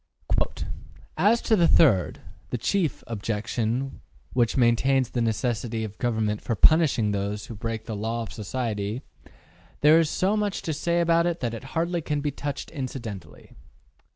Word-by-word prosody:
``As 210 +8 +3
to 225 - +3
the 170 -4 +4
third 110 - +4 0.3
the - - -2
chief 170 - 0
objection, 115 +4 -2 0.3
which 120 -1 +2
maintains 130 +1 +3
the 120 - -1
necessity 115 0 -1
of 105 -2 -5
a - - -31
government 110 -4 0
for 115 - -2
punishing 140 - +4
those 100 +1 -2
who - - -8
break 110 +1 -4
the 110 - -4
law 115 +3 -2
of - - -9
society, 110 +1 -3 0.8
there 155 +2 +7
is 160 -2 +2
so 190 +5 +1
much 210 -2 -1
to 160 - -2
say 170 +3 0
about 170 0 +3
it 170 -1 -1
that 120 -3 -1
it 115 +3 -7
hardly 170 +1 0
can 150 -1 -1
be 145 0 -1
touched 140 0 -5
incidentally. 130 - -7
125 Hz, 160 wpm, -26 LUFS, 110-160 Hz, 0.8 s, there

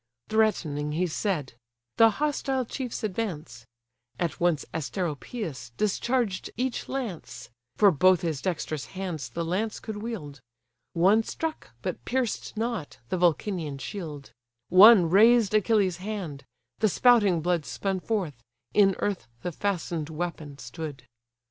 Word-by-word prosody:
Threatening 155 -10 +1
he 175 +4 +1
said: 165 - -2 0.4
the 225 0 +8
hostile 270 +1 -1
chiefs 250 0 -5
advance; 160 - -4 0.5
At 170 -4 -2
once 170 -4 +1
Asteropeus 160 - -4
discharged 215 0 0
each 250 0 -2
lance, 235 - -5 0.2
(For 205 -2 +6
both 185 +3 +4
his 160 -5 -2
dexterous 155 -7 -3
hands 180 -6 -4
the 170 0 -3
lance 205 +6 -1
could 220 -2 -6
wield,) 150 - -6 0.5
One 190 +6 +4
struck, 320 +7 -5
but - - -4
pierced 250 -4 -2
not, 225 - -3
the 185 - 0
Vulcanian 170 -3 0
shield; 150 -3 -7 0.4
One 190 0 +9
razed 215 +4 +5
Achilles' 210 -4 +3
hand; 185 -9 -5 0.3
the 215 - +3
spouting 205 -6 +4
blood 175 -1 +1
Spun 195 +4 -2
forth; 175 - -3 0.3
in 195 -2 +5
earth 195 - -2 0.2
the 180 - -2
fasten'd 170 -4 -2
weapon 155 -3 -5
stood. 150 -4 -7
185 Hz, 125 wpm, -27 LUFS, 155-220 Hz, 0.5 s, One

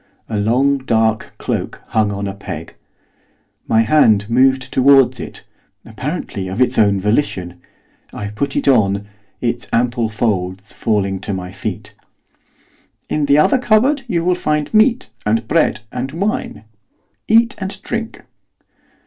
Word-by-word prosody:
A 110 -2 -2
long 130 +6 +2
dark 110 -3 0
cloak - - -4
hung 110 -2 +1
on 100 0 -3
a 95 - -4
peg. 100 +1 -8 0.9
My 110 - +4
hand 110 -6 +4
moved 130 +1 +2
towards 135 -1 +5
it, - - -8 0.4
apparently 115 - -5
of 95 +5 -5
its 125 - +2
own 100 -2 +3
volition. 95 -5 -1 0.5
I 105 - -5
put 135 +7 -3
it - - -1
on, 100 -6 +3 0.4
its 120 0 -2
ample 120 -1 +1
folds 100 -3 -2
falling 100 -4 -1
to 100 +1 -4
my 90 -1 -6
feet. 100 - -6 1.2
'In 150 -1 0
the 140 0 +4
other 260 - +4
cupboard 255 +5 +3
you 170 -6 -1
will 180 - +3
find 150 -2 -1
meat, 225 +3 +3
and 110 +1 0
bread, 155 -8 +1
and 125 +2 -4
wine. 200 - -2 0.6
Eat 230 +3 +4
and 190 0 -5
drink. 230 -1 -5
120 Hz, 140 wpm, -18 LUFS, 105-150 Hz, 1.2 s, towards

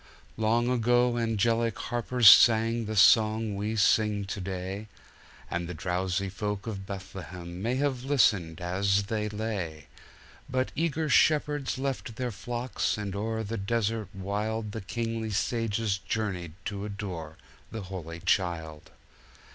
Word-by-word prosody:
Long 115 +2 +1
ago 120 0 +3
angelic 115 0 +1
harpers 120 0 +1
sang 115 +2 +7
the 110 +1 -4
song 110 +2 +5
we 105 +3 -2
sing 105 0 +3
to 95 +1 -5
day, 95 +3 -5 0.6
And 85 0 -3
the 90 - -5
drowsy 90 +3 -1
folk 100 +1 -4
of 100 -4 -5
Bethlehem 90 -2 -7
may 120 +4 0
have 135 -2 -1
listened 100 - +2
as 100 +3 +1
they 105 +1 -2
lay! 100 -8 -4 0.6
But 130 0 0
eager 160 0 0
shepherds 150 -2 +2
left 130 -6 -3
their 125 +1 -2
flocks, 120 +3 -2
and 100 -2 -4
o'er 110 +2 -2
the 110 +2 -4
desert 110 +1 -1
wildThe 105 +1 -3
kingly 115 -1 -2
sages 105 0 0
journeyed 95 -7 -3
to 100 -1 -4
adore 95 -7 -6 0.3
the 110 - -5
Holy 85 -3 -7
Child! 80 -5 -1
105 Hz, 130 wpm, -28 LUFS, 95-115 Hz, 0.6 s, sang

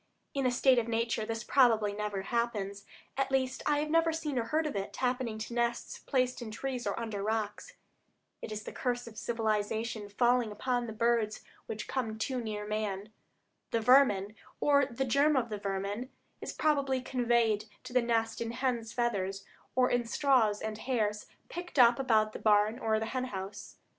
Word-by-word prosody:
In 275 -2 +1
a - - +2
state 255 0 +4
of 230 - -2
nature 230 -1 -1
this 225 0 -3
probably 225 -6 +4
never 205 -2 -3
happens; 205 -3 -2 0.3
at 270 0 +1
least 260 -1 0
I 295 - +3
have 300 +1 -1
never 330 0 +4
seen 305 -5 -2
or 230 - -1
heard 310 +7 0
of 300 - -3
it 195 0 -4
happening 250 -3 -1
to 220 +2 -6
nests 235 0 -1
placed 255 -2 0
in 235 - -5
trees 250 +2 -4
or - - -1
under 220 -3 -4
rocks. 210 0 -2 0.7
It - - -6
is 215 0 -4
the - - -7
curse 245 -1 -2
of 230 -2 -11
civilization 220 -1 -1
falling 240 +1 +2
upon 245 +2 -1
the - - -5
birds 225 -1 +1 0.3
which 215 -1 -5
come 225 -5 -2
too 250 +3 -2
near 210 -2 -4
man. 210 -1 -3 0.6
The 230 - +1
vermin, 220 -5 +4 0.3
or 280 -2 +4
the 265 +1 -2
germ 280 +4 +3
of 240 -2 0
the 210 -1 -4
vermin, 200 +5 -3 0.3
is - - -4
probably 280 -4 +1
conveyed 235 -4 +1 0.2
to - - -9
the 250 - +4
nest 225 -1 0
in 230 0 -3
hen's 240 -3 -1
feathers, 195 -5 -1 0.3
or 255 0 +3
in 245 -1 +1
straws 230 -5 +2
and 220 0 -4
hairs 215 -4 -1 0.2
picked 350 -2 -7
up 240 -1 +7
about 220 -5 +2
the - - -6
barn 215 +2 +3
or 220 -3 +1
hen 250 +4 -2
house. 195 -3 -7
230 Hz, 185 wpm, -31 LUFS, 215-255 Hz, 0.7 s, up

